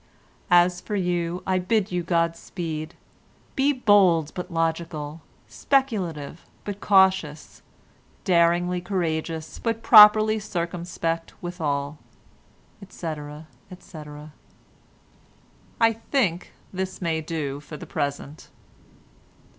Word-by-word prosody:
"As 175 0 +4
for 210 - -4
you 175 -2 -1
I 185 -1 +1
bid 195 +2 0
you 180 0 -1
God 170 -1 0
speed. 160 -2 -6 0.6
Be 275 +2 +3
bold 195 - +3
but 180 +1 -6
logical, 165 -2 -3 0.3
speculative 185 - -1 0.2
but 205 -1 -6
cautious, 190 -6 +2 0.6
daringly 175 -1 +2
courageous, 165 -4 -3
but 230 -1 -2
properly 215 0 +8
circumspect 170 -3 -4
withal," 150 -4 -3 0.8
etc., 155 -5 -7 0.2
etc. 150 -5 -11 1.5
I 225 0 +4
think 220 - -1 0.2
this 185 0 -4
may 165 -3 -1
do 150 -4 -4
for 150 +1 -10
the - - -9
present. 145 +1 -5
175 Hz, 95 wpm, -24 LUFS, 160-190 Hz, 1.5 s, properly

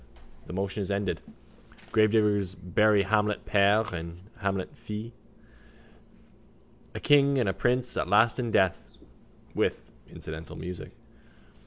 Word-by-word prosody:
The - - -7
motion 95 +2 -2
is 100 - -3
ended. 100 -1 -1 0.7
Gravediggers 105 -3 +2
bury 100 +3 +3
Hamlet 105 +1 0
père 105 +1 +3
and 85 0 -6 0.2
Hamlet 95 -2 -2
fils. 105 +2 -7 1.8
A - - -3
king 140 -1 +4
and 120 -5 +1
a 95 - +1
prince 125 0 +1
at - - -1
last 110 +6 +4
in 120 -2 -1
death, 95 -4 +1 0.6
with - - -1 0.2
incidental 80 +1 -8
music. 90 -1 -7
100 Hz, 120 wpm, -28 LUFS, 95-110 Hz, 1.8 s, king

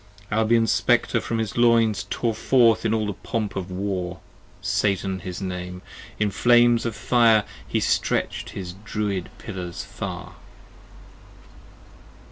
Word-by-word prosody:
Albion's 110 0 +3
Spectre - - +2
from 115 - -2
his 110 -1 -3
Loins, 115 -3 +4
55 - - -12
Tore 115 -2 -1
forth 115 0 +3
in - - 0
all 110 -1 0
the 105 - -2
pomp 105 +1 -3
of 95 -1 -4
War: 90 -1 -3 0.4
Satan 95 -2 0
his 90 +1 -6
name: 90 0 -5 0.4
in 105 -1 +1
flames 120 +1 +4
of 115 - -4
fire 115 -1 +4 0.2
He - - 0
stretch'd - - 0
his 90 -2 -6
Druid 105 -5 -2
Pillars 90 -6 -6
far. - - -7
105 Hz, 130 wpm, -24 LUFS, 95-115 Hz, 0.4 s, Loins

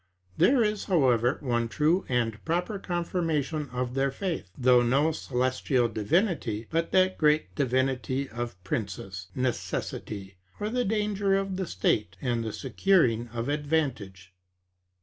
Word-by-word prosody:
There 255 - +4
is, 210 -1 -1
however, 130 - +3
one 120 -3 0
true 160 +9 +2
and 115 -3 -1
proper 180 +5 -1
confirmation 165 -5 -1
of 125 0 -3
their 135 +1 +1
faith, 165 - -4
though 125 -1 +5
no 135 +6 +3
celestial 130 -3 0
divinity, 115 - 0
but 165 +1 0
that 185 0 +3
great 150 0 +2
divinity 130 0 0
of 120 0 -5
princes, 95 -2 -4
Necessity; 105 -5 -3 0.2
or, 210 +1 -2
the 250 0 0
danger 205 -2 +1
of 195 -1 -1
the 190 -1 -3
state; 95 +1 0
and 120 0 -1
the 110 - -3
securing 125 - +2
of 115 +1 -4
advantage. 135 - -2
135 Hz, 130 wpm, -28 LUFS, 120-170 Hz, 0.2 s, though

